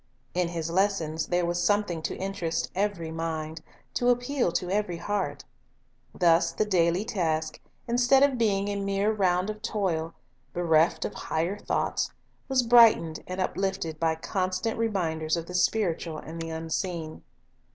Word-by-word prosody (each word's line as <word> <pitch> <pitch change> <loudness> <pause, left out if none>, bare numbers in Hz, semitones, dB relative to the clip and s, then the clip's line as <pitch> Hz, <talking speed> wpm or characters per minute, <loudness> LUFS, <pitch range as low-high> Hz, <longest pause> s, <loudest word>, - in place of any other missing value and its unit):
In 180 -1 +1
His 165 -1 -3
lessons 170 -4 0
there 175 0 +1
was 175 0 -1
something 205 -5 +1
to - - -3
interest 175 -4 -2
every 190 -4 -1
mind, 160 -1 -4 0.3
to 245 - +2
appeal 245 -3 +1
to 180 0 -1
ever) 200 -4 0
heart. 190 -6 -3 0.7
Thus 170 -1 +4
the 215 - 0
daily 180 0 +2
task, 160 -8 -1 0.3
instead 245 +3 +4
of 275 -3 +2
being 200 -3 +2
a 205 - -2
mere 200 +1 +1
round 185 -1 +1
of 215 0 -10
toil, 180 -8 -1 0.4
bereft 165 -1 +2
of - - -4
higher 170 +6 -2
thoughts, - - -1 0.4
was 260 -2 +3
brightened 230 -9 +5
and 185 +1 -5
uplifted 190 -4 -2
by 160 -1 +2
constant 185 +6 -2
reminders 165 -8 0
of 165 - -4
the 180 - -9
spiritual 180 -4 0
and 165 +2 -7
the 165 - -4
unseen. 160 0 -4
180 Hz, 150 wpm, -27 LUFS, 165-205 Hz, 0.7 s, brightened